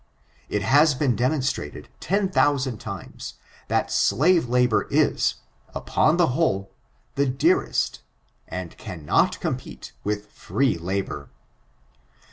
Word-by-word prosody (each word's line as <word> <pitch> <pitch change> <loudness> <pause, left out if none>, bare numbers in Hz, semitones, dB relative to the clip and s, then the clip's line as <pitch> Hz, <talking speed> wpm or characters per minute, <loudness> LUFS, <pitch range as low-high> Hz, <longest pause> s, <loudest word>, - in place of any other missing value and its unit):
It 105 -1 -1
has 145 +6 +5
been 130 -3 +1
demonstrated 130 - -1
ten 195 0 0
thousand 135 - +1
times, 100 -5 -7 0.3
that - - 0
slave 155 - +3
labor 125 -2 +2
is, - - +2 0.4
upon 155 +3 +2
the 175 -5 +4
whole, 100 - 0 0.4
the 140 0 +1
dearcsst, 145 +8 +1 0.5
and 90 -1 -6
cannot 80 -5 0
compete - - -5
with 105 0 -3
free 135 -5 0
labor. 85 -5 -4
125 Hz, 105 wpm, -24 LUFS, 100-145 Hz, 0.5 s, has